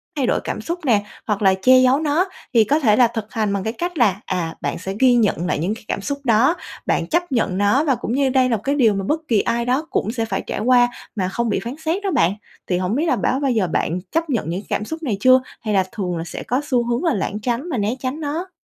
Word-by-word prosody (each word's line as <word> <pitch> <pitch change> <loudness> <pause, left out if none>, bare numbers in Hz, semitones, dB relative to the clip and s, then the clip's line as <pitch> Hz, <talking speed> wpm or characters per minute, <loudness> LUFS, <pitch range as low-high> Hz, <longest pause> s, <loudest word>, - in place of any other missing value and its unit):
thay 280 -4 0
đổi - - +2
cảm 215 - -4
xúc 340 +8 -4
nè, 220 -5 +3 0.3
hoặc 210 -2 -1
là 190 -1 +5
che 255 0 +6
giấu 255 +2 +4
nó 315 +4 +1 0.3
thì 230 - +6
có 290 +9 +1
thể 220 -7 +4
là 245 +1 +5
thực 225 -2 -6
hành 215 -4 0
bằng 195 - -2
cái 220 +3 -2
cách 350 +2 -4
là, 205 -5 +2
à, 175 -3 -3
bạn - - -2
sẽ 190 +3 -5
ghi 260 -2 +5
nhận 205 -7 +1
lại - - 0
những 185 +7 -1
cái 225 - -13
cảm - - -2
xúc 280 +8 -3
đó, 250 +7 +3 0.3
bạn - - 0
chấp 345 -1 0
nhận 210 -6 0
nó 205 +8 +3
và 280 -4 +2
cũng 235 - -4
như 270 0 +2
đây 255 -1 +3
là 230 - +2
một 200 - -12
cái 280 +1 0
điều 230 -7 +4
mà 195 0 -2
bất 315 +1 0
kỳ 220 -6 +3
ai 235 0 -1
đó 265 +6 0
cũng 220 - -1
sẽ 230 -2 -2
phải 225 - -2
trải - - -3
qua 245 +1 +4 0.3
mà 190 -4 -1
không 235 +3 -1
bị - - 0
phán 240 +3 -5
xét 360 +6 -1
đó 390 - 0
bạn. 195 - +2 0.3
Thì 180 - +1
hổng 185 +4 -1
biết 310 +5 +1
là - - +2
báo 265 - 0
bao 275 -2 +1
giờ 215 -6 +1
bạn 170 +2 -1
chấp 330 -1 -1
nhận 225 - -1
những 180 +4 -3
cảm 210 - -1
xúc 320 +4 -6
này 215 -8 -1
chưa, 255 +3 +6 0.2
hay 215 -2 -2
là 190 - +3
thường 180 -5 -3
là 165 - -3
sẽ 170 - -7
có 250 +5 -1
xu 245 -3 +2
hướng 240 +7 -1
là 330 - +2
lảng 205 -1 -2
tránh 245 +8 -2
và 275 - -2
né 210 +3 0
tránh 265 +4 -3
nó? 320 +5 -3
235 Hz, 290 wpm, -20 LUFS, 205-280 Hz, 0.3 s, che